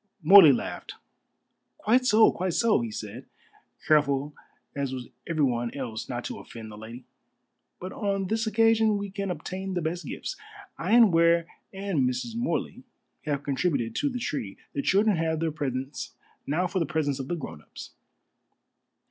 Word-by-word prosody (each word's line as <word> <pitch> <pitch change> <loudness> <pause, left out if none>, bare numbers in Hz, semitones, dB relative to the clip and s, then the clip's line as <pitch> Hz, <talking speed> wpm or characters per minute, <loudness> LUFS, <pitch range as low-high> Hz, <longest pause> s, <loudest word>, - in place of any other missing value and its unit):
Morley 180 -2 +10
laughed. 125 - -4 0.8
"Quite 250 +4 +2
so, 220 0 +6
quite 180 -1 -2
so," 230 - +3
he 115 - -3
said, 105 -1 -7 0.6
careful 145 -1 +2 0.4
as 140 -2 -2
was 130 -2 -6 0.2
everyone 125 -8 0
else 120 -5 -5
not 120 -1 -4
to - - -6
offend 110 -2 -10
the - - -9
lady, 115 +4 -10 0.7
"but 185 +1 -7
on 195 -2 -1
this 220 +4 -1
occasion 220 -1 +3
we 200 -1 -5
can 200 0 -4
obtain 185 +3 -4
the 175 - 0
best 170 +3 -3
gifts. - - -5 0.4
I 185 +6 -1
and 230 -6 +7
Ware 170 0 +4 0.3
and 190 -10 0
Mrs. 125 - -4
Morley 235 +2 -2 0.4
have 145 -2 -2
contributed 135 -5 -1
to 290 - +1
the 250 - -4
tree. 125 - -4 0.2
The 140 - -1
children 200 +4 +3
have 160 -1 0
their 165 0 0
presents, 135 -2 -4 0.3
now 160 +6 +1
for 185 +1 -1
the 165 - 0
presents 145 -4 -1
of 135 - -5
the 175 - -2
grown 85 - -8
ups." - - -11
165 Hz, 165 wpm, -27 LUFS, 135-200 Hz, 0.8 s, Morley